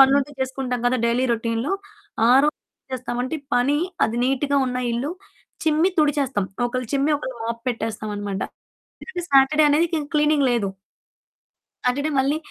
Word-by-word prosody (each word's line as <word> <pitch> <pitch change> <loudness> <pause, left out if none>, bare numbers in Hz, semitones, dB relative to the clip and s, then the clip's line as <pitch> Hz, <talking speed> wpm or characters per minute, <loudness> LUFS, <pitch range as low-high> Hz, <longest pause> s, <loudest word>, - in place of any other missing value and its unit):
పనులుంటే 275 +1 +5
చేసుకుంటాం 260 -1 -2
కదా! 250 +1 +3
డైలీ 240 +2 +2
రొటీన్‌లో. 230 - -1 0.6
ఆ - - +6
రోజేం 300 - 0 0.4
చేస్తామంటే 250 +3 -3 0.2
పని 275 +4 +2 0.3
అది 225 - -4
నీట్‌గా 270 +2 +1
ఉన్న 250 0 -2
ఇల్లు 255 +7 -2 0.5
చిమ్మి 315 +3 +3
తుడిచేస్తాం. 280 -8 +2 0.2
ఒకళ్ళు 255 0 -3
చిమ్మి, 280 +2 +2
ఒకళ్ళు 260 -3 -6
మోప్ 230 0 -4
పెట్టేస్తామనమాట. 210 -3 -4 0.6
ఎందుకంటే, 360 -7 -6
సాటర్డే 275 +3 +5
అనేదిక 325 +4 +2
ఇంక 290 - -8
క్లీనింగ్ 300 -2 +3
లేదు. 215 -5 0 1.1
సాటర్డే 285 +5 +1
మళ్ళీ 275 +3 +1
265 Hz, 135 wpm, -23 LUFS, 240-290 Hz, 1.1 s, ఆ